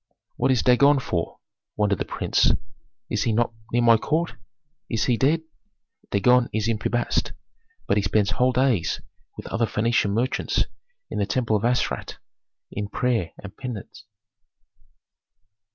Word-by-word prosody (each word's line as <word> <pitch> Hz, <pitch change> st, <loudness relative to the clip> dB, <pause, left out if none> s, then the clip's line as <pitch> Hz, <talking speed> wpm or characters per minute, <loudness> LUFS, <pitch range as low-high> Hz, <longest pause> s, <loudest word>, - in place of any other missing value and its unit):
"What -, -, +1 dB
is 130 Hz, -4 st, +3 dB
Dagon 140 Hz, +3 st, +5 dB
for?" 90 Hz, -10 st, -2 dB, 0.4 s
wondered 105 Hz, -3 st, +1 dB
the -, -, -1 dB
prince. -, -, +1 dB, 0.6 s
"He -, -, -8 dB
is 110 Hz, -, 0 dB
not 115 Hz, +1 st, +1 dB, 0.2 s
near 120 Hz, 0 st, +2 dB
my 115 Hz, -1 st, +6 dB
court; 160 Hz, +5 st, -1 dB, 0.6 s
is 115 Hz, -3 st, 0 dB
he 125 Hz, -, +2 dB
dead?" 150 Hz, +7 st, +2 dB, 0.7 s
"Dagon 125 Hz, +4 st, +3 dB
is 110 Hz, 0 st, -1 dB
in 115 Hz, -2 st, 0 dB
Pi -, -, -1 dB
Bast, 120 Hz, -, 0 dB, 0.5 s
but 100 Hz, -, +2 dB
he -, -, +3 dB
spends 100 Hz, +1 st, +1 dB
whole 125 Hz, +4 st, +2 dB
days 125 Hz, -7 st, +1 dB, 0.4 s
with -, -, -8 dB
other 115 Hz, 0 st, 0 dB
Phœnician 115 Hz, -1 st, +1 dB
merchants 120 Hz, +5 st, 0 dB, 0.5 s
in -, -, -2 dB
the 100 Hz, -, 0 dB
temple 110 Hz, +1 st, 0 dB
of 105 Hz, -, 0 dB
Astarte 125 Hz, +1 st, -1 dB, 0.5 s
in 105 Hz, 0 st, -4 dB
prayer 115 Hz, -7 st, 0 dB
and 100 Hz, 0 st, -9 dB
penance." 110 Hz, -3 st, -8 dB
115 Hz, 150 wpm, -24 LUFS, 105-125 Hz, 0.7 s, my